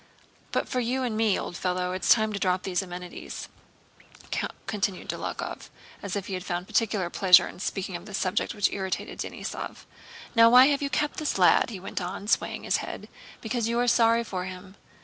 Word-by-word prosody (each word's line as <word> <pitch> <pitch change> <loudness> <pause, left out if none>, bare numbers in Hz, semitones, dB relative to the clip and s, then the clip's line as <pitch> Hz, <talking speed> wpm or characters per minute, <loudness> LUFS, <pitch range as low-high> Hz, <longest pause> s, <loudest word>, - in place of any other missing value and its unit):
"But - - 0
for 255 - -1
you 250 +2 0
and 235 -3 -1
me, 220 -2 +2
old - - -5
fellow, 180 0 -1
it's 185 0 -2
time 220 -2 +4
to 200 - -3
drop 185 -1 +1
these 185 -1 0
amenities," 180 -1 -7 1.2
continued 200 -3 -2
Dólokhov, - - -5 0.3
as 200 -1 -4
if 200 -2 -3
he 190 -2 -3
found 180 -1 -3
particular 195 -5 0
pleasure 180 -2 +6
in - - -11
speaking 195 -1 -3
of 175 +4 -7
this 205 -2 -4
subject 190 +5 -1
which 205 -2 +2
irritated 190 -2 -4
Denísov. - - -6 0.5
"Now, 230 0 +8
why 250 +2 +9
have 285 0 +1
you 280 - -1
kept 295 +2 -1
this 305 -8 -1
lad?" 180 +5 +5
he 205 -5 -6
went 190 - -5
on, 190 +3 -5
swaying 230 - 0
his - - +2
head. - - -7 0.3
"Because 230 0 -1
you 235 +1 0
are 245 0 +2
sorry 230 -1 +4
for 185 -5 -4
him! 185 +1 -9
200 Hz, 190 wpm, -27 LUFS, 185-230 Hz, 1.2 s, why